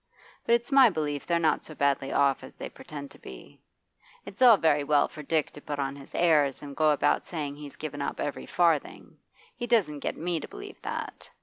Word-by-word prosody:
But 235 - +6
it's 235 +3 -3
my 270 -3 +7
belief 150 -5 -3
they're 170 - +2
not 165 -2 +2
so 155 - -11
badly 140 -1 +1
off 140 -1 +2
as - - -11
they - - -7
pretend 140 -2 -9
to - - -15
be. - - -12 0.6
It's - - -10
all 240 -4 +8
very 150 -4 +2
well 145 0 +3
for 155 - -10
Dick 155 +1 0
to 145 - -12
put 145 0 -5
on 140 0 -2
his 140 -1 -12
airs 150 -6 +3
and 140 -1 -8
go 155 +1 +3
about 150 - +2
saying 150 -4 -5
he's 145 -1 -10
given 145 -2 -6
up 140 - -3
every 145 - -4
farthing; 165 -4 0 0.4
he 240 - -5
doesn't 200 -11 +2
get - - -3
me 170 0 -1
to - - -8
believe - - -10
that. - - -6
150 Hz, 215 wpm, -28 LUFS, 140-170 Hz, 0.6 s, all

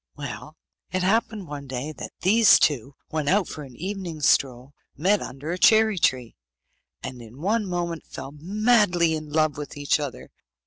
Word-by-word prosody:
Well, - - -8 0.3
it 185 -1 -1
happened 215 0 0
one 145 -1 -7
day 130 +3 -4
that - - -8
these 215 +4 +6
two, 135 -1 0
when 155 -2 -2
out 190 +2 +3
for 155 - -7
an 135 -4 -11
evening 185 0 -5
stroll, 130 -1 +1 0.2
met 195 +7 +2
under 135 +5 -6
a 180 - -3
cherry 220 -2 +5
tree, 125 -6 0 0.7
and 130 -1 -7
in 115 +3 -13
one 210 +5 0
moment 175 -2 -3
fell 135 - -8
madly 185 +1 +2
in 155 -1 -5
love 155 -2 +1
with 150 0 -7
each 145 +2 +1
other. 145 -3 -6
155 Hz, 170 wpm, -24 LUFS, 140-195 Hz, 0.7 s, these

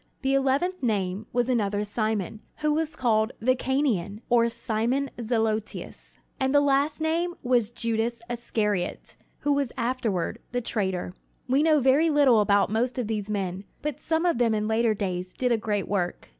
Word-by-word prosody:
The 270 0 +2
eleventh 275 +7 +1
name 205 -3 -1
was 245 0 +1
another 210 -5 +1
Simon, 215 -1 -2 0.2
who 300 -1 +2
was 315 0 -1
called 220 -2 +1
"the 255 +3 +3
Cananean" 235 -8 -1
or 235 -1 +4
"Simon 235 +4 -1
Zelotes"; 220 -2 -2 0.3
and 265 +1 +1
the - - +8
last 285 +2 +2
name 335 +2 0
was 245 -4 +2
Judas 230 0 -2
Iscariot, 215 -5 -2 0.3
who 290 - +2
was 280 -3 0
afterward 230 -7 -1
the 245 - +1
traitor. 190 -6 -2 0.3
We 265 +3 +3
know 310 -1 +4
very 275 +5 +4
little 285 -6 +5
about 200 0 +3
most 240 +4 0
of 250 - -1
these 210 -1 -3
men, 195 -2 -2 0.2
but 300 -3 -3
some 325 +1 0
of 340 -9 +2
them 230 -2 +3
in 210 0 -1
later 220 0 +2
days 185 -2 -3
did 250 -1 0
a - - +5
great 205 -2 -2
work. 180 -4 -2
235 Hz, 170 wpm, -26 LUFS, 210-270 Hz, 0.3 s, the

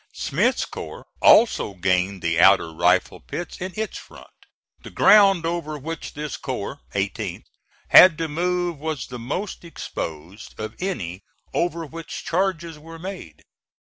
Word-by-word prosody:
Smith's - - 0
corps - - -8 0.2
also 215 - +5
gained 95 +1 0
the 85 0 +1
outer 95 -3 +5
rifle 90 +3 +2
pits 165 - -7
in 185 +1 -3
its 220 0 -3
front. - - -15 0.5
The - - -10
ground 195 -5 +5
over 165 -3 -3
which 165 +4 -7
this 150 0 -5
corps 130 -1 -5 0.2
(18th) 100 0 -3 0.5
had 180 -4 +9
to 165 -1 -2
move 175 +1 -1
was 150 -6 -3
the 125 -1 -8
most 180 - -4
exposed 90 - -7
of 110 - -5
any 100 - -4 0.3
over 170 -1 -1
which 165 +2 -8
charges 170 -3 -1
were 165 +2 -11
made. 175 - -9
155 Hz, 140 wpm, -23 LUFS, -, 0.5 s, had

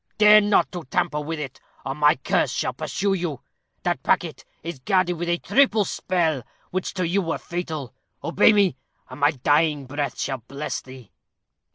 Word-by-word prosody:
Dare 210 0 +8
not 205 0 +2
to 175 -3 -6
tamper 150 +3 -1
with 160 +1 -4
it, 135 -4 -6 0.3
or 135 - -2
my 150 +1 +4
curse 130 - 0
shall - - -2
pursue 200 0 -1
you. 170 -8 -3 0.4
That - - 0
packet - - 0 0.2
is 165 -4 -6
guarded 185 +6 +1
with 175 0 -4
a 175 - +2
triple 225 -2 +3
spell, 165 -9 0 0.3
which 185 +1 -3
to 180 -2 0
you 195 +4 +1
were 165 -2 -2
fatal. 160 -7 -5 0.3
Obey 170 +7 +5
me, 200 -9 +3 0.3
and 130 - -9
my 145 0 +5
dying 145 +1 +1
breath 145 +2 -3
shall 135 -2 -2
bless 140 +6 -5
thee." 130 -6 -13
165 Hz, 175 wpm, -24 LUFS, 140-185 Hz, 0.4 s, Dare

